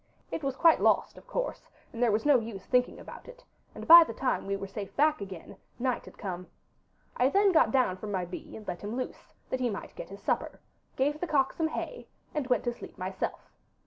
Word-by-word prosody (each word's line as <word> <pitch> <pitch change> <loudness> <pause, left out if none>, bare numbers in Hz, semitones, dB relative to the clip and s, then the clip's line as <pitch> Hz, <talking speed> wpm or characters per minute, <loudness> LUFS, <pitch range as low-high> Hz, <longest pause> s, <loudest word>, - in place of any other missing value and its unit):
It - - -3
was 270 -1 -1
quite 330 +2 +5
lost, - - +3
of - - -15
course, - - -4 0.2
and 230 - -6
there 240 -2 +4
was 215 +4 0
no 290 -4 +6
use 220 -4 -7
thinking 250 -1 +1
about - - -11
it, - - -13 0.3
and - - -8
by 335 +1 +12
the - - -7
time 255 -6 -1
we 200 - 0
were 195 - -5
safe 200 0 -7
back 300 -3 +3
again 190 -4 -8 0.2
night 255 0 -1
had - - -14
come. 180 -3 -5 0.7
I 250 +2 +4
then 400 +5 +4
got 330 - +5
down 250 -9 +2
from 210 +2 -6
my 185 -2 -1
bee, 175 - -8
and 215 - -12
let 175 - -4
him 210 +3 -4
loose, 255 0 -6 0.2
that 260 - 0
he 250 -1 +1
might 200 - -6
get - - -8
his 200 0 -11
supper, - - -1 0.4
gave 290 +3 0
the 355 - -2
cock 275 -4 +2
some 320 - 0
hay, 480 +9 -5 0.3
and 295 -4 -2
went 250 -4 +2
to 240 - -1
sleep - - -11
myself. 185 +1 -4
250 Hz, 230 wpm, -29 LUFS, 200-295 Hz, 0.7 s, by